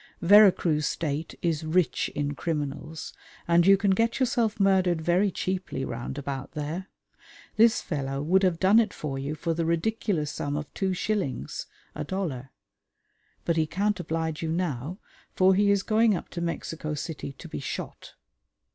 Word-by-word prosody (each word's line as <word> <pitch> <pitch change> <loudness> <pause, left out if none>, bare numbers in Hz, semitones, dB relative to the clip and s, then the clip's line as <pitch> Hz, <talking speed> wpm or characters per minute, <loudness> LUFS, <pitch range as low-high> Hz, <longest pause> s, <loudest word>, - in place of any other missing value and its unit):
Vera 205 +3 +8
Cruz 150 -5 0
State 155 -1 -3
is 165 -3 0
rich 165 +2 +1
in 145 0 -1
criminals, 150 0 -4 0.3
and 170 +1 +4
you 195 0 +8
can 200 0 +2
get 230 +6 +1
yourself 235 -5 +1
murdered 190 -3 +3
very 175 +5 +2
cheaply 185 -7 -3
round 120 +3 -5
about 140 0 -5
there. 160 +5 -4 0.7
This 225 +1 +4
fellow 135 -3 -3
would 185 +5 +3
have 180 -4 +1
done 195 +4 +6
it 220 -3 0
for 135 -3 -4
you 140 +3 -3
for 165 +1 -2
the 165 +1 -1
ridiculous 170 -2 0
sum 145 0 -3
of 150 -1 -6
two 190 -1 -1
shillings 185 - -2 0.3
(a - - -4
dollar); 150 -10 -4 1.0
but 170 -1 +1
he 160 -1 +2
can't 205 +4 0
oblige 160 -2 -2
you 165 - -2
now, 160 -1 -2 0.4
for 190 0 +5
he 200 +2 +3
is 200 -1 +3
going 220 -1 +3
up 170 - -6
to 170 - -5
Mexico 165 -2 -3
City 150 -2 -5
to - - -11
be 75 - -6
shot. - - -6
170 Hz, 165 wpm, -27 LUFS, 150-195 Hz, 1.0 s, Vera